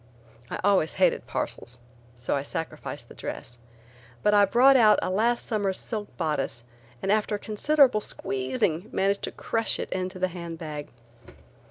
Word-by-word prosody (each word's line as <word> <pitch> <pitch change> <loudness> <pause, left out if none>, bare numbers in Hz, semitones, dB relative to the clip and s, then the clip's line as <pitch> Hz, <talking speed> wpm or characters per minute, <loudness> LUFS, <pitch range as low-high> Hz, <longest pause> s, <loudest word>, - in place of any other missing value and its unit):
I - - -4
always 195 -5 +3
hated - - +2
parcels 120 +1 -4 0.4
so 120 +3 -1
I 140 - 0
sacrificed 160 +3 -5
the - - -13
dress, 120 0 -7 0.6
but 210 - +4
I 205 -1 +7
brought 255 +7 +6
out 220 -4 +6
a - - -2
last 230 +5 +1
summer's 200 -4 0
silk 215 -3 -5
bodice 150 -8 -2 0.4
and 195 - +1
after 210 0 +1
considerable 245 +3 +3
squeezing 135 - -2
managed 200 +1 +1
to - - -6
crush 225 -2 -1
it - - -5
into 185 0 -3
the 185 0 0
hand 170 -2 -7
bag. 150 -3 -6
190 Hz, 155 wpm, -26 LUFS, 155-215 Hz, 0.6 s, I